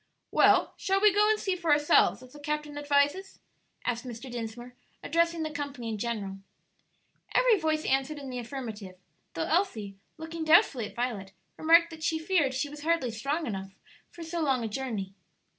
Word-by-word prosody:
"Well, - - +4
shall 390 0 +1
we 415 -1 +5
go 420 +1 +4
and 435 0 +2
see 380 -2 -1
for 340 -3 -1
ourselves, 290 -3 +4
as 255 - -15
the 295 - -12
captain 300 0 -3
advises?" 290 +6 +1 0.5
asked 240 0 -1
Mr. 250 +1 -8
Dinsmore, 240 +1 -6 0.3
addressing 335 +1 +1
the 310 - -3
company 285 -5 -5
in 215 -2 -4
general. 200 -4 -3 1.0
Every 480 -5 +5
voice 315 -1 0
answered 270 +3 0
in 275 -2 -7
the 250 - -4
affirmative, 225 -7 -7 0.4
though 165 - -1
Elsie, 225 - -1 0.2
looking 320 +1 -6
doubtfully 315 - +4
at - - -15
Violet, 220 -6 -3 0.2
remarked 335 +1 +5
that 320 -1 -10
she 320 0 0
feared 320 -5 +1
she 265 +3 -1
was 295 +1 -10
hardly 320 -6 +1
strong 280 +9 -2
enough 195 -4 -5 0.3
for 340 - -10
so 330 +1 -3
long 265 -5 +1
a - - -1
journey. 210 -5 -4
285 Hz, 175 wpm, -29 LUFS, 235-325 Hz, 1.0 s, we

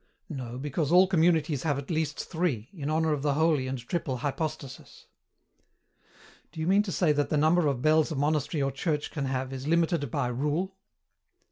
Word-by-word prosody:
"No, 125 -5 -6
because 145 +2 -2
all 180 +2 +7
communities 165 -5 +2
have 145 -2 0
at 140 +4 -6
least 155 -2 -1
three, 155 - -2
in 150 -6 -4
honour 160 0 +1
of 145 - -2
the 145 -1 +1
holy 155 -4 +2
and 130 0 -3
triple 130 +1 -3
Hypostasis." 145 -1 -5 1.5
"Do 160 - -10
you 160 - -1
mean 195 +4 +4
to 205 -2 -4
say 170 -3 +2
that 145 -1 0
the 150 - +1
number 155 +2 +3
of 135 -4 -1
bells 155 +1 +3
a - - -2
monastery 145 +1 0
or 135 - 0
church 150 -3 -2
can 145 -4 -3
have 130 0 -2
is 135 +1 -6
limited 165 -3 +1
by 125 0 -1
rule?" 150 +9 -1
150 Hz, 190 wpm, -28 LUFS, 140-165 Hz, 1.5 s, all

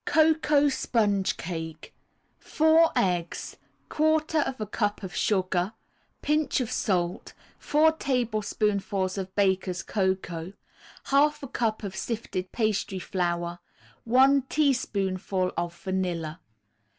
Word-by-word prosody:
COCOA 305 -2 +3
SPONGE 205 -7 +1
CAKE 160 - -6 0.5
4 320 +1 +4
eggs, 180 -8 -1 0.3
1/4 310 -3 +1
a 215 - -2
cup 205 0 -2
of 185 - -6
sugar, 185 -1 0 0.5
Pinch 300 -1 +1
of 250 -3 -2
salt, 175 -3 -1 0.2
4 310 +2 +4
tablespoonfuls 210 -8 -1
of 190 0 -6
Baker's 190 -2 +1
Cocoa, 190 -3 -2 0.6
1/2 285 +2 +3
a - - -4
cup 225 -2 -1
of 195 -2 -5
sifted 200 -5 -4
pastry 215 -4 -1
flour, 175 -2 -2 0.5
1 265 +4 +5
teaspoonful 195 -10 0
of 170 0 -3
vanilla. 180 -5 -3
205 Hz, 100 wpm, -27 LUFS, 185-270 Hz, 0.6 s, 1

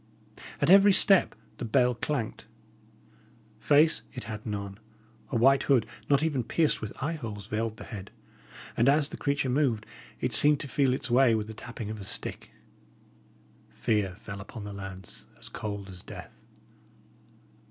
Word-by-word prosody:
At 145 +4 +3
every 200 +1 +8
step 195 0 +4 0.2
the - - -6
bell 125 +2 +3
clanked. 120 -1 -3 1.1
Face, 150 +2 +4
it 125 - -6
had 105 0 -6
none; 100 -1 -5 0.5
a - - -3
white 135 +4 +5
hood, 130 -4 +4 0.2
not 140 +1 +4
even 145 -6 0
pierced 155 +6 +1
with 105 -1 -5
eye 155 +3 0
holes, 105 -7 -7
veiled 110 +1 -3
the - - -9
head; 100 -3 -8 0.7
and 120 +4 +4
as 145 +1 +3
the - - -7
creature 140 -1 0
moved, 125 -5 +1 0.3
it - - -1
seemed 150 -1 +6
to - - -4
feel 135 -2 +2
its 130 - -5
way 125 -2 +5
with 110 -1 -1
the 110 - -8
tapping 110 0 -7
of 110 - -6
a - - -6
stick. 95 - -4 1.2
Fear 100 -4 -1
fell 100 -1 -8
upon 105 +2 -9
the 100 0 -7
lads, 95 -2 -9
as - - -8
cold 100 -2 -5
as 90 -2 -9
death. - - -12
115 Hz, 165 wpm, -28 LUFS, 105-140 Hz, 1.2 s, every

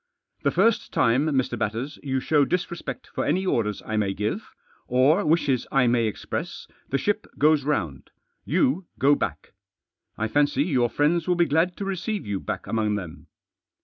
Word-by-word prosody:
"The - - +2
first 230 -1 +2
time, 130 +5 +2
Mr. 130 -5 0
Batters, 115 +7 -3
you 135 -2 -1
show 145 +2 +3
disrespect 170 -4 -3
for - - -1
any 190 +1 0
orders 105 - 0
I 110 - -2
may 100 -2 0
give, 110 - -3 0.4
or 135 +10 +3
wishes 145 -6 +1
I 135 -2 +4
may 120 -1 +2
express, 105 - -5 0.2
the 140 - +1
ship 205 +9 -1
goes 150 -1 +4
round 95 - -2 0.2
— - - -50
you 170 +7 +2
go 140 +2 +4
back. - - -3 0.6
I 110 - -1
fancy 145 +4 +2
your 130 -7 +1
friends 160 +6 +1
will 180 - +3
be 175 0 +3
glad 165 +4 +1
to 200 - -4
receive 195 +2 -3
you 100 -2 -2
back - - -5
among 110 -2 0
them." 90 -6 -7
140 Hz, 175 wpm, -25 LUFS, 115-170 Hz, 0.6 s, I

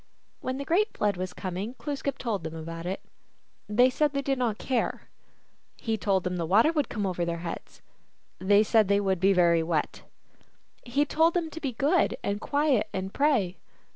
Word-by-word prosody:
When 255 0 -3
the 280 - -5
great 405 +8 +1
Flood 205 -2 +1
was 185 0 -4
coming 190 +6 -5
Glooskap 280 +2 -3
told 210 -8 -2
them 160 0 -5
about 165 +1 -6
it. 190 - -3 0.7
They 245 +5 +4
said 295 +2 +1
they 280 0 -1
did 270 -1 0
not 230 -4 0
care. 250 0 -2 0.7
He 225 -1 -1
told 195 -4 +1
them 180 0 -2
the 170 - -1
water 220 - +5
would 300 -4 0
come 210 -3 -2
over 180 -2 -1
their 170 0 -2
heads. 170 - -7 0.6
They 200 +3 +4
said 220 -1 +3
that 200 +1 +2
would 190 -2 +1
be 195 +2 +4
very 170 -3 +4
wet. 160 -2 -1 0.8
He 275 +4 +1
told 325 +3 +2
them 330 -3 -1
to 325 - -8
be 270 -4 -2
good 290 +9 +2
and 205 +1 -2
quiet, 285 -7 +1
and 190 0 -4
pray. 250 -11 +1
210 Hz, 190 wpm, -27 LUFS, 185-275 Hz, 0.8 s, water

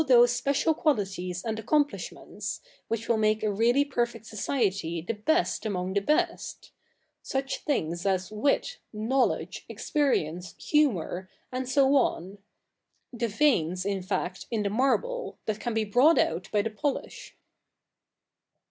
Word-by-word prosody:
se 245 -4 +7
special 280 +6 +1
equalities 190 - -1
and 220 -1 -2
accomplishments, 290 +6 -2 0.3
which 230 0 -3
will 230 - +3
make 215 0 +2
a 215 - +2
really 240 +7 +3
perfect 240 -4 -2
society 195 -7 -1
the 175 +8 -3
best 315 +12 +1
among 190 -3 -2
the 200 - +3
best 330 - -1 0.2
— - - -46 0.2
such 270 0 -2
things 170 - -1
as 190 0 0
wit, 280 - 0
knowledge, 230 +5 0
experience, 180 - -1
humour, 190 - +1 0.2
and 255 0 -3
so 275 0 +4
on 200 -7 0 0.4
— - - -49
the 235 -1 -1
veins, 190 - +2
in 200 -1 -1
fact, 185 -1 -3
in 225 -3 -1
the 200 - -1
marble, 275 - 0
that 215 -1 -3
ran 240 -2 -2
be 220 -1 +1
brought 255 +10 +5
out 170 +4 +1
by 210 -1 +2
the 225 - -3
j)olish.' 285 +6 -4
225 Hz, 140 wpm, -28 LUFS, 195-275 Hz, 0.4 s, se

